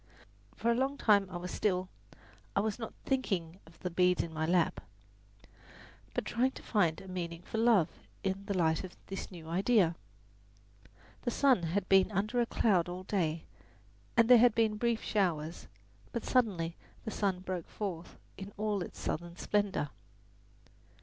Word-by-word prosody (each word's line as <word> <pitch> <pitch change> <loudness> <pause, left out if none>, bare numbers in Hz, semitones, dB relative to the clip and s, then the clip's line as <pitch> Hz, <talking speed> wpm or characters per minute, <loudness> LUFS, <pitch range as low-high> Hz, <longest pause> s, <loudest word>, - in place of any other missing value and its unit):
For 235 - +1
a - - +2
long 270 +3 0
time 200 -5 +4
I 180 - -5
was 180 +1 -6
still 185 -3 0 0.7
I - - +4
was 215 +2 -1
not 225 - -6
thinking 190 -10 -1
of 165 - -17
the 180 - -3
beads 180 +1 +3
in 165 - -7
my 160 0 -1
lap, 175 -1 +2 1.3
but - - -1
trying 250 +3 +2
to - - -11
find 170 -8 +2
a 190 - -11
meaning 175 -2 -5
for 220 - -4
"love" 225 -8 +5 0.4
in 195 0 -2
the 200 -3 -1
light 160 -1 +2
of 185 - -9
this 195 - -6
new 170 -4 -10
idea. 185 0 +3 1.3
The - - -1
sun 260 -4 +4
had 180 +4 -1
been 195 +1 +5
under 215 +5 +1
a 235 - +1
cloud 185 -9 +2
all 180 +1 -5
day, 170 -5 -1 0.7
and 230 -1 +6
there 250 -1 +9
had 240 -1 +5
been 220 -2 +2
brief 235 0 0
showers; 170 -6 -1 0.4
but 235 - -4
suddenly 185 -10 +1 0.3
the 220 - -3
sun 195 -4 0
broke 185 -3 -4
forth 180 -5 -5 0.2
in 195 +1 -8
all 210 -2 0
its - - -7
southern 170 +2 -4
splendour. 200 -9 0
190 Hz, 165 wpm, -32 LUFS, 175-220 Hz, 1.3 s, there